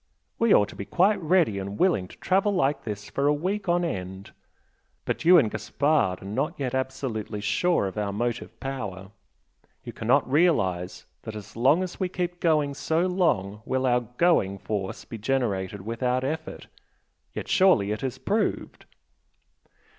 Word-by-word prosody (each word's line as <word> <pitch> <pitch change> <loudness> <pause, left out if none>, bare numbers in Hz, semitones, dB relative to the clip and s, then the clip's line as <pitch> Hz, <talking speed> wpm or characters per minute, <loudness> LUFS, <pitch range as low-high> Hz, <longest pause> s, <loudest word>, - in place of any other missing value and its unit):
We 230 -2 +3
ought 105 - +5
to - - -11
be 100 - -6
quite 195 - +2
ready 160 - +2
and 100 +1 -5
willing 170 - +2
to - - -15
travel 195 +2 +1
like 140 -5 +1
this 105 -2 -5
for 140 +1 -1
a 145 - +4
week 190 +5 -2
on 175 0 +2
end! 95 - -5 0.7
But - - -3
you 180 +1 +8
and 115 -10 +3
Gaspard 140 - 0
are - - -10
not 105 +11 -2
yet 130 -3 -2
absolutely 130 -5 -3
sure 170 - +1
of 95 +2 -4
our 100 -1 -1
motive 120 +3 -3
power! 105 -8 -5 0.7
you - - -8
cannot - - +2
realise 100 - +1 0.2
that 110 - -7
as 105 -2 -10
long 135 +10 +3
as 185 - -7
we 185 -2 0
keep 175 -1 -3
going 150 -4 +2
so 160 +4 0
long 110 - 0
will 130 +2 -1
our 125 -1 +3 0.2
'going' 135 - +3
force 100 -1 -4
be 115 - -8
generated 100 -5 -1
without 125 +4 -1
effort 160 +4 -4 0.7
yet - - -5
surely 180 - +4
it 105 - -3
is 130 -3 -3
proved!" 210 +1 -2
130 Hz, 165 wpm, -26 LUFS, 100-170 Hz, 0.7 s, you